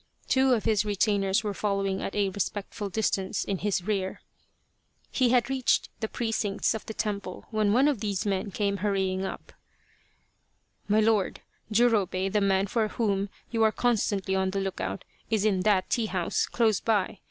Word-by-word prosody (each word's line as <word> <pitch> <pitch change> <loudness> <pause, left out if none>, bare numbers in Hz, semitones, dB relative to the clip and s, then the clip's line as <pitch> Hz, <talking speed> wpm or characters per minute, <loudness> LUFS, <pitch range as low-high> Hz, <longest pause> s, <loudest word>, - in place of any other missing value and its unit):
Two 265 0 +4
of 220 - -2
his 215 -2 +3
retainers 205 0 +1
were 210 -1 -2
following 195 -1 -1
at - - -4
a 200 -1 +2
respectful 200 +2 -4
distance 195 -2 -1
in 195 -2 -3
his 200 -3 0
rear. 195 -2 -2 0.9
He 255 -3 +2
had 245 -1 +3
reached 265 -2 +1
the 220 - -2
precincts 220 -3 -1
of 220 - -5
the 220 - -6
temple 200 -4 -4
when 215 -2 +2
one 255 +6 +4
of 285 -7 +1
these 200 -2 -2
men 195 0 -1
came 200 +1 -1
hurrying 190 -1 0
up: 190 - -7 0.7
" - - -44
My 210 +1 +3
lord! 215 -3 +1 0.3
Jurobei, 205 -5 +2
the 210 +1 +1
man 195 -1 +2
for 220 +2 0
whom 200 -3 -1 0.2
you 230 -2 0
are 220 -1 +5
constantly 205 -5 0
on 190 0 +1
the 195 +1 -2
look 195 -1 -3
out, 195 - -4 0.2
is 220 -2 +1
in 200 -3 +2
that 190 -1 +2
tea 230 -3 +1
house 185 -4 -1
close 220 -4 +2
by. 210 -3 0
205 Hz, 175 wpm, -27 LUFS, 195-220 Hz, 0.9 s, are